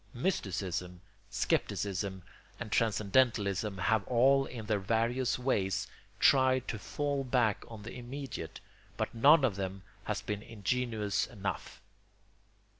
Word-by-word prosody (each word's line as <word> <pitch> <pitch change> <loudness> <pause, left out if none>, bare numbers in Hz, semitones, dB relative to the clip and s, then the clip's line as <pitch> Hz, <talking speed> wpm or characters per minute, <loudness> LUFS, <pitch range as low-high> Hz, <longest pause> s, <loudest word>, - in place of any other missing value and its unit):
Mysticism, 95 - -2 0.3
scepticism, 95 -1 -1 0.4
and 120 -3 -6
transcendentalism 105 -2 +2
have 100 +3 +2
all 135 +3 +4
in 115 -3 -7
their 105 -1 +1
various 115 +5 +1
ways 100 -6 0 0.3
tried 130 -1 +4
to 110 - -3
fall 145 +5 -2
back 120 -5 +1
on 110 -3 -10
the 110 - -7
immediate; 125 - -6 0.4
but - - -2
none 140 +5 +6
of 105 -7 0
them 95 0 -4 0.2
has - - -2
been 105 -1 -3
ingenuous 110 -1 -1
enough. 100 -5 -5
110 Hz, 115 wpm, -32 LUFS, 100-125 Hz, 0.4 s, none